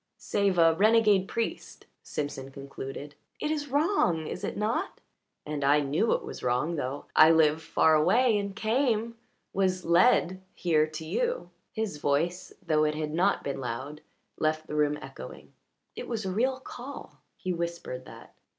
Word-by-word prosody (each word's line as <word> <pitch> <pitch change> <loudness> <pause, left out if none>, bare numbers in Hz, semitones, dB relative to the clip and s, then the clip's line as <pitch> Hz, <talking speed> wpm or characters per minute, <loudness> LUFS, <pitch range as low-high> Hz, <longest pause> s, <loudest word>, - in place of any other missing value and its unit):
"Save 200 -3 0
a 165 -1 +6
renegade 210 0 +4
priest," 230 +1 -4 0.2
Simpson 145 -2 -5
concluded. 135 +1 -8 0.3
"It 300 - -1
is 290 -2 -2
wrong, 280 - +1
is - - -6
it - - -3
not? 230 - -2 0.5
And 150 -1 -3
I 145 +2 +4
knew 150 +11 +1
it - - -1
was - - -8
wrong, 125 +7 0
though 140 -1 -4
I 155 - +8
live 160 -1 +4
far 160 0 +3
away 225 +10 +4
and 200 -1 -4
came 230 0 0 0.4
was 185 -1 0
led 180 +1 +4
here 155 -3 +2
to 155 +1 -7
you." 485 - -2 0.2
His 220 -8 -3
voice, 155 +5 -1
though 155 -2 +2
it 150 0 +1
had 155 -1 -3
not 185 +5 +2
been 140 -1 -3
loud, 130 +5 -5 0.4
left 155 0 0
the - - -8
room 150 -1 +1
echoing. - - -10 0.4
"It - - -6
was 225 -4 -3
a 190 - -1
real 255 +6 0
call." 265 +1 -9 0.2
He 185 - -3
whispered 170 -7 -4
that. - - -13
170 Hz, 160 wpm, -28 LUFS, 150-220 Hz, 0.5 s, I